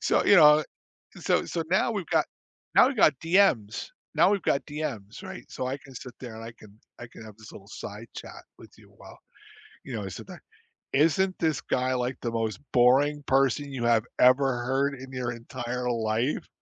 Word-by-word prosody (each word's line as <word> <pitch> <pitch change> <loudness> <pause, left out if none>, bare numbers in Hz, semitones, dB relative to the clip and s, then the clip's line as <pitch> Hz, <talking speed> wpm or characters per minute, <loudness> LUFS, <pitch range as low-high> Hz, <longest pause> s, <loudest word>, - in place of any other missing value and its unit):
So, - - +2
you 200 - +6
know, 150 -2 +7 0.6
so - - +1
so 165 - -3
now 190 +5 +2
we've 200 -5 -4
got - - +2 0.5
now - - +7
we've 270 - -4
got 155 - +5
DMs 165 - +2 0.3
now - - +5
we've 200 -3 0
got 140 - 0
DMs, 140 -10 -6
right? - - -8
So, 130 - -4
I 135 +2 -3
can 135 -1 -16
sit 125 0 -9
there 120 -3 -8
and 115 - -9
I 115 - -8
can 110 -2 -18 0.2
I 120 - -8
can 115 - -13
have 110 -2 -12
this 110 - -13
little 100 0 -13
side 105 +2 -9
chat - - -10
with - - -14
you - - -19
while, - - -14 0.7
you 130 - -6
know, 105 - -4
I 95 - -5
sit 90 - -9
there? - - -11 0.5
"Isn't 165 +6 +2
this 160 -4 0
guy 130 0 -1
like 125 +1 -2
the 120 - -2
most 115 -2 -2
boring 140 +4 +4
person 135 +1 +1
you 125 -3 -4
have 115 -1 +3
ever 130 -1 +4
heard 135 +3 0
in 130 0 -11
your 125 -2 -3
entire 125 +1 -5
life? 115 +3 -1
130 Hz, 200 wpm, -27 LUFS, 115-145 Hz, 0.7 s, know